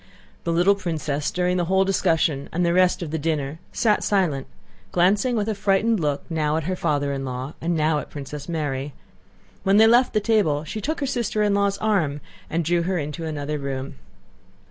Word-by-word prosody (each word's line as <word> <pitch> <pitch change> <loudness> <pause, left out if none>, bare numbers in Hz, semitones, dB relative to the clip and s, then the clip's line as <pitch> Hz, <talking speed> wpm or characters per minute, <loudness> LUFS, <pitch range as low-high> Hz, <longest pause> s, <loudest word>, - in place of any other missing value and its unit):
The 170 - 0
little 175 +4 +4
princess 155 -6 -2
during 180 0 0
the 175 - +1
whole 190 +2 +3
discussion 165 -7 +1
and 175 +1 0
the 170 - +2
rest 185 0 +3
of 155 - -6
the 160 - -2
dinner 150 -1 -2
sat 215 -3 +2
silent, 175 -10 +1 0.4
glancing 200 +8 +2
with 210 -2 0
a 220 - 0
frightened 205 +2 +2
look 145 -3 -1
now 155 -2 0
at 160 - -2
her 185 +4 -2
father 145 -4 0
in 135 -1 -3
law 130 +2 -5
and 170 0 0
now 155 0 +2
at - - -8
Princess 145 +2 -7
Mary. 145 -4 -3 0.7
When 195 +1 +3
they 220 - +8
left 240 +3 +4
the - - +5
table 200 -10 +2
she 215 +7 -5
took 310 +6 -3
her - - +1
sister 235 -4 -1
in 205 -1 +2
law's 200 0 +1
arm 185 -10 0 0.3
and 165 0 -1
drew 175 +2 +2
her 180 +2 -1
into 150 +2 -4
another 150 -1 -3
room. 135 -1 -4
170 Hz, 200 wpm, -23 LUFS, 150-200 Hz, 0.7 s, they